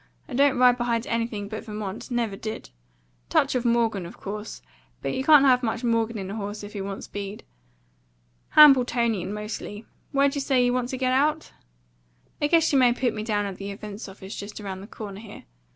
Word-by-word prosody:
I -, -, -9 dB
don't 275 Hz, +1 st, +3 dB
ride 250 Hz, 0 st, +5 dB
behind 235 Hz, -1 st, 0 dB
anything 230 Hz, -3 st, -2 dB
but 215 Hz, +1 st, -6 dB
Vermont; 210 Hz, -1 st, -6 dB
never 235 Hz, -5 st, -1 dB
did. 215 Hz, -, -7 dB, 0.6 s
Touch -, -, +2 dB
of 250 Hz, -2 st, 0 dB
Morgan, 235 Hz, -5 st, +1 dB
of -, -, -12 dB
course; 210 Hz, +2 st, -7 dB, 0.4 s
but -, -, -1 dB
you 265 Hz, -, -2 dB
can't 295 Hz, -1 st, +7 dB
have 250 Hz, -2 st, +5 dB
much 230 Hz, 0 st, -2 dB
Morgan 230 Hz, -1 st, +1 dB
in 190 Hz, -1 st, -5 dB
a -, -, -5 dB
horse 205 Hz, 0 st, -5 dB
if 205 Hz, -, -9 dB
you 200 Hz, -2 st, -4 dB
want 195 Hz, 0 st, -6 dB
speed. 205 Hz, 0 st, -7 dB, 1.1 s
Hambletonian 245 Hz, -, +6 dB
mostly. 210 Hz, 0 st, -6 dB, 0.3 s
Where'd 275 Hz, -1 st, +3 dB
you 285 Hz, -, -2 dB
say 265 Hz, -2 st, +2 dB
you 245 Hz, -, +2 dB
wanted 250 Hz, -1 st, 0 dB
to 260 Hz, -, -3 dB
get 255 Hz, 0 st, +1 dB
out?" 300 Hz, +4 st, +1 dB, 0.9 s
"I 295 Hz, -, +3 dB
guess 330 Hz, 0 st, +3 dB
you 275 Hz, -, +5 dB
may 245 Hz, -2 st, +5 dB
put 245 Hz, -2 st, 0 dB
me 215 Hz, -, -4 dB
down 210 Hz, -2 st, -1 dB
at 195 Hz, -2 st, -5 dB
the 200 Hz, 0 st, -6 dB
Events 205 Hz, +1 st, -7 dB
Office, 190 Hz, 0 st, -9 dB
just 205 Hz, +2 st, -7 dB
round 190 Hz, -2 st, -6 dB
the 200 Hz, -, -10 dB
corner 205 Hz, -3 st, -8 dB
here. 215 Hz, -2 st, -11 dB
225 Hz, 200 wpm, -25 LUFS, 205-255 Hz, 1.1 s, can't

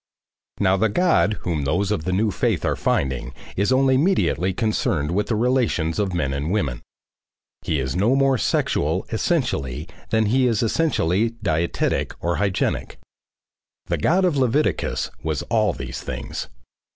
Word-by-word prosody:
Now 95 Hz, -1 st, +3 dB
the 110 Hz, +3 st, +2 dB
God 175 Hz, -, +3 dB
whom 85 Hz, -5 st, -2 dB
those 90 Hz, +8 st, 0 dB
of 80 Hz, -7 st, -1 dB
the 95 Hz, -, 0 dB
new 105 Hz, +3 st, +1 dB
faith -, -, 0 dB
are -, -, +1 dB
finding 65 Hz, -1 st, -1 dB, 0.2 s
is 100 Hz, +5 st, +1 dB
only 130 Hz, 0 st, +4 dB
mediately 145 Hz, -, +2 dB
concerned 90 Hz, -7 st, 0 dB
with 105 Hz, +4 st, 0 dB
the 115 Hz, -, 0 dB
relations 110 Hz, -8 st, +1 dB
of 100 Hz, -2 st, 0 dB
men 70 Hz, -6 st, 0 dB
and 70 Hz, +3 st, -2 dB
women. 85 Hz, -, -1 dB, 0.8 s
He 75 Hz, -, -1 dB
is 65 Hz, +1 st, -2 dB
no 105 Hz, +8 st, +3 dB
more 135 Hz, -2 st, +3 dB
sexual -, -, 0 dB
essentially 70 Hz, +4 st, -1 dB, 0.2 s
than 110 Hz, 0 st, +2 dB
he 125 Hz, +4 st, +3 dB
is 115 Hz, -2 st, +1 dB
essentially 115 Hz, -, +1 dB
dietetic 85 Hz, -3 st, 0 dB
or 85 Hz, 0 st, -1 dB
hygienic. 100 Hz, -2 st, -1 dB, 0.9 s
The -, -, -2 dB
God 185 Hz, +4 st, +3 dB
of 170 Hz, -6 st, +1 dB
Leviticus 135 Hz, +3 st, 0 dB
was 80 Hz, -3 st, -2 dB
all 110 Hz, -3 st, +3 dB
these -, -, -6 dB
things. 65 Hz, -1 st, -5 dB
100 Hz, 150 wpm, -22 LUFS, 80-120 Hz, 0.9 s, only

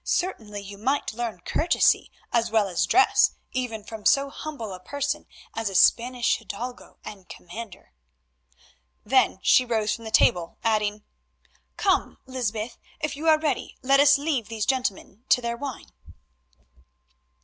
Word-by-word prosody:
Certainly 220 Hz, -, -2 dB
you 200 Hz, 0 st, -10 dB
might 265 Hz, +2 st, 0 dB
learn 225 Hz, -5 st, -4 dB
courtesy 335 Hz, -, +2 dB, 0.2 s
as 235 Hz, -1 st, +2 dB
well 220 Hz, -2 st, +2 dB
as 180 Hz, -3 st, 0 dB
dress, 390 Hz, -, +4 dB, 0.2 s
even 240 Hz, -4 st, -3 dB
from 220 Hz, -1 st, -9 dB
so 275 Hz, +4 st, +3 dB
humble 275 Hz, -10 st, -6 dB
a 185 Hz, -, -8 dB
person 285 Hz, +8 st, -3 dB, 0.3 s
as 225 Hz, -2 st, -2 dB
a 195 Hz, -, -7 dB
Spanish 240 Hz, +5 st, +3 dB
hidalgo 235 Hz, +3 st, -8 dB
and 195 Hz, -4 st, -10 dB
commander." 180 Hz, -, -10 dB, 1.1 s
Then 255 Hz, -2 st, +3 dB
she 255 Hz, -, +5 dB
rose 220 Hz, -3 st, 0 dB
from 230 Hz, -, -7 dB
the -, -, -5 dB
table, 175 Hz, -5 st, +2 dB
adding—"Come, 215 Hz, -, -2 dB
Lysbeth, 235 Hz, -3 st, -3 dB, 0.2 s
if 310 Hz, -2 st, -2 dB
you 310 Hz, +3 st, -4 dB
are 310 Hz, -, +6 dB
ready, 300 Hz, -5 st, -2 dB
let 275 Hz, +1 st, +4 dB
us 285 Hz, 0 st, +7 dB
leave 280 Hz, -6 st, -1 dB
these 220 Hz, -2 st, -3 dB
gentlemen 250 Hz, -4 st, -2 dB
to -, -, +5 dB
their 235 Hz, -1 st, -3 dB
wine." 265 Hz, 0 st, -7 dB
235 Hz, 140 wpm, -25 LUFS, 210-275 Hz, 1.1 s, us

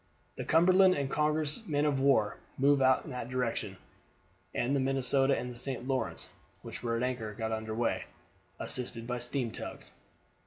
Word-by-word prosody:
The -, -, -4 dB
Cumberland 185 Hz, +3 st, +5 dB
and 140 Hz, -1 st, -2 dB
Congress 150 Hz, +5 st, 0 dB
men 145 Hz, -2 st, +1 dB
of 145 Hz, -2 st, +1 dB
war 135 Hz, -6 st, +3 dB, 0.2 s
moved 140 Hz, +1 st, +4 dB
out 130 Hz, 0 st, +4 dB
in 150 Hz, -, -7 dB
that 125 Hz, -2 st, -5 dB
direction, 115 Hz, -6 st, -2 dB, 0.7 s
and 125 Hz, +4 st, 0 dB
the -, -, +2 dB
Minnesota 135 Hz, +1 st, +3 dB
and 125 Hz, -, -4 dB
the -, -, -9 dB
St. 125 Hz, 0 st, -4 dB
Lawrence, 135 Hz, -1 st, -2 dB, 0.4 s
which -, -, -6 dB
were 115 Hz, -1 st, -1 dB
at 115 Hz, -, -1 dB
anchor, 120 Hz, -5 st, -2 dB
got 110 Hz, 0 st, -3 dB
under 110 Hz, 0 st, -3 dB
weigh, 115 Hz, 0 st, 0 dB, 0.5 s
assisted 120 Hz, -2 st, -4 dB
by 125 Hz, +1 st, -3 dB
steam 120 Hz, -1 st, -2 dB
tugs. -, -, -7 dB
130 Hz, 170 wpm, -31 LUFS, 120-140 Hz, 0.7 s, Cumberland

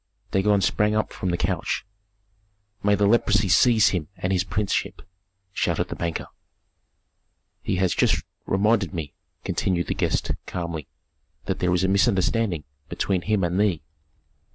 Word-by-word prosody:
Dagon 100 Hz, +1 st, +3 dB
sprang 105 Hz, +3 st, +2 dB
up 110 Hz, -, -1 dB
from 95 Hz, -, -3 dB
the 85 Hz, -, 0 dB
couch. -, -, -1 dB, 1.0 s
"May 105 Hz, 0 st, +3 dB
the 100 Hz, -, +2 dB
leprosy 105 Hz, -1 st, +3 dB
seize 110 Hz, +4 st, +5 dB
him 85 Hz, -6 st, -2 dB
and 90 Hz, +1 st, -1 dB
his 90 Hz, -1 st, +2 dB
princeship!" 100 Hz, +1 st, -2 dB, 0.5 s
shouted -, -, 0 dB
the -, -, -4 dB
banker. 85 Hz, -1 st, -3 dB, 1.4 s
"He -, -, -1 dB
has 95 Hz, -1 st, +1 dB
just -, -, +2 dB, 0.2 s
reminded 100 Hz, -2 st, +1 dB
me," 75 Hz, -4 st, -5 dB, 0.3 s
continued 90 Hz, -3 st, 0 dB
the -, -, -1 dB
guest, -, -, -1 dB, 0.2 s
calmly, 85 Hz, -5 st, -4 dB, 0.6 s
"that 95 Hz, -, -2 dB
there 90 Hz, -, +1 dB
is 90 Hz, +1 st, +2 dB
a -, -, +3 dB
misunderstanding 95 Hz, -2 st, +2 dB, 0.3 s
between 95 Hz, -3 st, -1 dB
him 105 Hz, 0 st, 0 dB
and 90 Hz, +2 st, 0 dB
thee." 95 Hz, -8 st, +1 dB
95 Hz, 145 wpm, -24 LUFS, 90-105 Hz, 1.4 s, seize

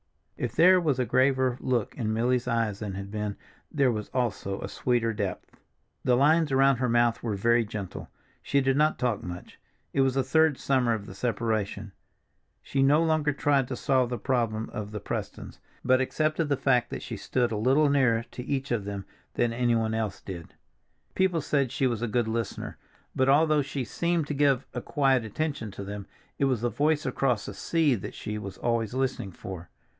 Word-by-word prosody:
If 120 Hz, -1 st, -4 dB
there 180 Hz, +2 st, +6 dB
was 150 Hz, -6 st, +1 dB
a 125 Hz, -, +1 dB
graver 130 Hz, +1 st, +2 dB
look 125 Hz, -4 st, -1 dB
in 110 Hz, -4 st, -2 dB
Milly's 120 Hz, +2 st, +1 dB
eyes 115 Hz, -4 st, 0 dB
than 100 Hz, -3 st, -5 dB
had 100 Hz, 0 st, -6 dB
been, 105 Hz, -1 st, -3 dB, 0.3 s
there 140 Hz, -4 st, +3 dB
was 105 Hz, -2 st, -4 dB
also 115 Hz, -6 st, -2 dB
a -, -, -4 dB
sweeter 120 Hz, -2 st, 0 dB
depth. 100 Hz, -3 st, -4 dB, 0.5 s
The 125 Hz, -1 st, +3 dB
lines 155 Hz, +2 st, +4 dB
around 135 Hz, 0 st, +4 dB
her 125 Hz, 0 st, 0 dB
mouth 120 Hz, 0 st, +2 dB
were 110 Hz, -3 st, -2 dB
very 115 Hz, +4 st, +3 dB
gentle. 105 Hz, -3 st, -7 dB, 0.3 s
She 140 Hz, -, +1 dB
did 135 Hz, 0 st, +2 dB
not 150 Hz, +2 st, +3 dB
talk 120 Hz, -4 st, 0 dB
much. 90 Hz, 0 st, -8 dB, 0.3 s
It 135 Hz, -, +2 dB
was 135 Hz, -1 st, +2 dB
the 135 Hz, -, +2 dB
third 160 Hz, +2 st, +3 dB
summer 130 Hz, -4 st, +1 dB
of 105 Hz, -2 st, -7 dB
the 95 Hz, -, -9 dB
separation; 105 Hz, -2 st, -2 dB, 0.7 s
she 135 Hz, -, -1 dB
no 145 Hz, +4 st, +5 dB
longer 155 Hz, -2 st, +2 dB
tried 140 Hz, -3 st, +1 dB
to 130 Hz, -, -4 dB
solve 130 Hz, -1 st, +1 dB
the 125 Hz, -, -2 dB
problem 115 Hz, -4 st, -1 dB
of 105 Hz, -1 st, -4 dB
the 105 Hz, 0 st, -5 dB
Prestons, -, -, -6 dB, 0.3 s
but 130 Hz, +1 st, +4 dB
accepted 155 Hz, +3 st, 0 dB
the 140 Hz, -, +2 dB
fact 125 Hz, -3 st, +2 dB
that -, -, -6 dB
she -, -, -6 dB
stood 125 Hz, -2 st, 0 dB
a -, -, -1 dB
little 135 Hz, +8 st, +3 dB
nearer 115 Hz, -5 st, +2 dB
to 125 Hz, -, -7 dB
each 135 Hz, 0 st, -3 dB
of 110 Hz, -5 st, 0 dB
them 100 Hz, -1 st, -5 dB, 0.3 s
than 120 Hz, -1 st, +1 dB
anyone 115 Hz, -2 st, +1 dB
else 110 Hz, -4 st, -2 dB
did. 85 Hz, -4 st, -9 dB, 0.6 s
People 185 Hz, -3 st, +1 dB
said 140 Hz, -4 st, 0 dB
she 135 Hz, 0 st, 0 dB
was 120 Hz, -3 st, 0 dB
a 120 Hz, -, 0 dB
good 120 Hz, +1 st, 0 dB
listener, 115 Hz, -1 st, -4 dB, 0.4 s
but 130 Hz, +1 st, +2 dB
although 155 Hz, +1 st, +4 dB
she 140 Hz, -1 st, -3 dB
seemed 170 Hz, +4 st, 0 dB
to 150 Hz, -, -3 dB
give 140 Hz, -3 st, +2 dB
a 125 Hz, -, -3 dB
quiet 135 Hz, -3 st, +2 dB
attention 130 Hz, +1 st, -3 dB
to 100 Hz, 0 st, -8 dB
them, 100 Hz, 0 st, -7 dB, 0.3 s
it 140 Hz, -, +3 dB
was 130 Hz, -5 st, +1 dB
the 120 Hz, -, +1 dB
voice 150 Hz, +1 st, +1 dB
across 125 Hz, -6 st, 0 dB
the -, -, -6 dB
sea 160 Hz, -, +1 dB
that 105 Hz, -, -5 dB
she 105 Hz, 0 st, -5 dB
was 100 Hz, -2 st, -7 dB
always 115 Hz, -1 st, -1 dB
listening 130 Hz, -7 st, -1 dB
for. 90 Hz, -1 st, -8 dB
125 Hz, 200 wpm, -27 LUFS, 110-140 Hz, 0.7 s, there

